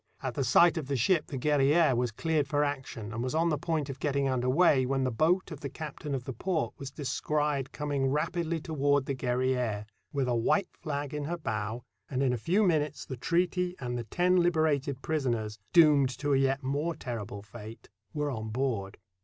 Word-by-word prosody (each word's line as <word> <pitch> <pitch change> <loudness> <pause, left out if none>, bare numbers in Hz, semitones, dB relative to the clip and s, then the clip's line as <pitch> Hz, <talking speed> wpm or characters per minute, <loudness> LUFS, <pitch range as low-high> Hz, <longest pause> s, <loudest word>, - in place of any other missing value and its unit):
At 130 -2 -2
the 135 - -1
sight 170 +7 +5
of 155 -4 -3
the 140 - -1
ship 150 - +2
the 135 - -5
Guerriere 145 +2 +3
was 120 0 +1
cleared 155 +4 0
for 145 +1 +1
action 130 -6 -4
and 115 - -3
was 130 +4 -2
on 165 +1 +3
the 150 - +1
point 160 -3 -1
of 135 -2 -7
getting 140 -2 0
under 125 -1 0
way 145 -2 +4
when 135 +1 0
the 130 - 0
boat 170 +9 +1
of 155 - -7
the 140 - -5
captain 150 -1 -5
of 130 - -4
the 130 - -5
port 165 - -1
was 140 - -5
descried 145 0 -1
coming 145 -2 -1
rapidly 165 +3 -1
toward 145 -3 +1
the 140 - -2
Guerriere, 125 -4 0 0.3
with 140 -3 0
a 125 - +1
white 175 - +2
flag 145 -3 -4
in 150 -1 -3
her 170 +3 -2
bow, 110 -4 -3 0.3
and 135 0 0
in 130 -2 +2
a - - 0
few 185 - +2
minutes 155 -6 +1
the 130 - -5
treaty 180 +5 0
and 125 -1 -3
the 120 -1 -4
ten 180 - +2
hberated 155 -5 +1
prisoners, 120 -8 -1
doomed 150 -5 +6
to 145 +1 0
a - - +4
yet 135 +1 +1
more 145 +5 -1
terrible 115 -7 -6
fate, 110 +1 -11 0.2
were 150 -1 -2
on 110 -3 -4
board. 110 -5 -2
140 Hz, 205 wpm, -29 LUFS, 125-155 Hz, 0.3 s, doomed